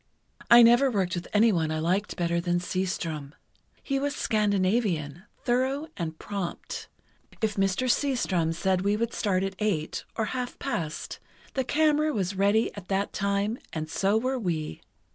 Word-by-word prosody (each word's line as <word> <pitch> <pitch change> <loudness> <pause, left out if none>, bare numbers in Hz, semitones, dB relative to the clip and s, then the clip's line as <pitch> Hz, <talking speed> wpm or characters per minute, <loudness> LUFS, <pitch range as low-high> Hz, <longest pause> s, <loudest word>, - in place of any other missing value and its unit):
I 240 0 +10
never 240 +4 +6
worked 190 -7 0
with 175 -1 -3
anyone 205 -7 +3
I 155 - -1
liked 180 +6 0
better 170 -1 0
than 175 0 +1
Seastrom. 170 -5 -3 0.5
He 275 -1 0
was 285 +1 -1
Scandinavian—thorough 210 - 0
and 160 -2 -4
prompt. 195 -3 -5 0.5
If 220 -2 0
Mr. 195 +5 +1
Seastrom 235 - +1
said 185 +1 +1
we 200 +2 +1
would 230 +1 -1
start 190 -3 +1
at 195 0 -2
eight, 180 -8 -1
or 220 - 0
half 250 -1 -4
past, 165 - -4 0.3
the 265 - 0
camera 305 +2 +2
was 195 -4 -1
ready 200 +4 +2
at 195 -3 -9
that 195 +1 -1
time, 200 +3 0
and 155 0 -4
so 200 +2 +2
were 255 +3 0
we. 160 - -3
200 Hz, 150 wpm, -27 LUFS, 175-235 Hz, 0.5 s, I